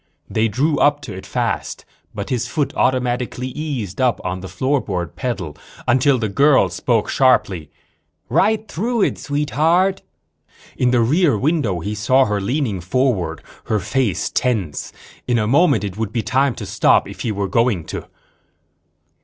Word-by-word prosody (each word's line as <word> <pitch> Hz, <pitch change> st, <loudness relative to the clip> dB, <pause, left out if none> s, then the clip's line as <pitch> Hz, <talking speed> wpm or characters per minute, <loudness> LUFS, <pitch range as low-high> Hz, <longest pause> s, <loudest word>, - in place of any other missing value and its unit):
They 110 Hz, +1 st, +1 dB
drew 140 Hz, +8 st, 0 dB
up 145 Hz, 0 st, +3 dB
to 120 Hz, -8 st, -7 dB
it 95 Hz, -, -9 dB
fast, -, -, -2 dB, 0.3 s
but -, -, -6 dB
his 125 Hz, -2 st, -1 dB
foot 150 Hz, -4 st, -1 dB
automatically 125 Hz, 0 st, 0 dB
eased 130 Hz, -, -4 dB
up 125 Hz, -2 st, +2 dB
on 90 Hz, +1 st, -2 dB
the 95 Hz, -, -7 dB
floorboard 95 Hz, -, -2 dB
pedal 95 Hz, -, -4 dB, 0.3 s
until 130 Hz, +2 st, +4 dB
the 110 Hz, -2 st, -1 dB
girl 130 Hz, -1 st, +4 dB
spoke 110 Hz, +5 st, 0 dB
sharply. 95 Hz, -, +2 dB, 0.6 s
"Right 215 Hz, -, +2 dB
through 225 Hz, +5 st, -1 dB
it, -, -, 0 dB
Sweetheart." 160 Hz, +6 st, +1 dB, 0.7 s
In 125 Hz, -, +2 dB
the 125 Hz, -1 st, +3 dB
rear 145 Hz, -, +3 dB
view 145 Hz, +10 st, +2 dB
mirror 100 Hz, -, -1 dB
he 105 Hz, -, -3 dB
saw 130 Hz, +6 st, +3 dB
her 105 Hz, -1 st, -1 dB
leaning 110 Hz, -, -1 dB
forward, 90 Hz, -, 0 dB, 0.2 s
her 110 Hz, -, 0 dB
face 105 Hz, -, -1 dB
tense. 100 Hz, -, -1 dB, 0.4 s
In 120 Hz, -, +2 dB
a 105 Hz, -, +1 dB
moment 140 Hz, +3 st, +3 dB
it 100 Hz, -1 st, -5 dB
would 110 Hz, -2 st, -2 dB
be 115 Hz, -, -1 dB
time 130 Hz, +4 st, +1 dB
to -, -, -6 dB
stop, -, -, +3 dB
if -, -, -10 dB
he 115 Hz, -, -1 dB
were 100 Hz, -1 st, -2 dB
going 115 Hz, -3 st, +1 dB
to. -, -, -5 dB
125 Hz, 160 wpm, -20 LUFS, 100-140 Hz, 0.7 s, until